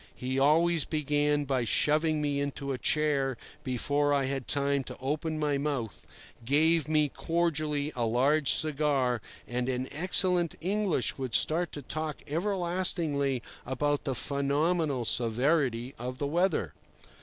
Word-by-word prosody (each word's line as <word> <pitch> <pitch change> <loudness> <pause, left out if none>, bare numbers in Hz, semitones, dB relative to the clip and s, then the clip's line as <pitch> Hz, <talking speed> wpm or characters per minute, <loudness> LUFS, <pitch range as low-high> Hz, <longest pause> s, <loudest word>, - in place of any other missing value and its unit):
He 130 +1 -2
always 160 +3 +4
began 145 -1 0
by 130 -2 0
shoving 155 +6 +1
me 145 -1 0
into 140 0 -4
a 130 - -3
chair 140 -3 +1 0.3
before 145 +3 0
I 140 -1 +1
had 135 -1 -3
time 140 -1 0
to - - -8
open 150 +4 -2
my 145 -2 0
mouth, 140 -8 -4 0.4
gave 155 +5 +3
me 155 -1 +3
cordially 155 -2 -1
a 120 -2 0
large 135 +6 +3
cigar, 140 -6 +1 0.3
and 125 +1 -2
in 130 0 -2
excellent 180 +1 +2
English 185 - -1
would 130 -4 -2
start 170 +2 +2
to 145 - -7
talk 155 +2 -4
everlastingly 170 - 0 0.2
about 145 +3 -1
the 135 - -1
phenomenal 140 0 0
severity 125 +1 +1
of 125 +1 -5
the 145 - -2
weather. 160 - 0
145 Hz, 135 wpm, -29 LUFS, 130-155 Hz, 0.4 s, always